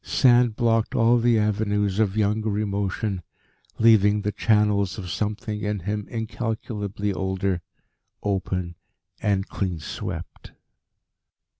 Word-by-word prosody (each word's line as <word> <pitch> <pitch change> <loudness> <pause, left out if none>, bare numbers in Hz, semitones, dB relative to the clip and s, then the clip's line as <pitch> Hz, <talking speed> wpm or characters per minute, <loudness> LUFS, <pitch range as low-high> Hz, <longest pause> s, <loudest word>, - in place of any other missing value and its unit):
Sand 120 -3 +4
blocked 115 +1 +1
all 120 0 +4
the 120 0 +3
avenues 105 -1 0
of 105 -2 +1
younger 105 0 +1
emotion, 100 -1 -2 0.6
leaving 105 -2 +5
the 105 - 0
channels 105 -3 +2
of 90 -4 -5
something 105 +3 -3
in 105 -2 -2
him 105 +3 -3
incalculably 110 -3 -3
older, 95 -1 -1 0.6
open 95 -3 -1 0.5
and 100 -1 +1
clean 95 -4 -2
swept. 75 - -7
105 Hz, 110 wpm, -24 LUFS, 100-110 Hz, 0.6 s, leaving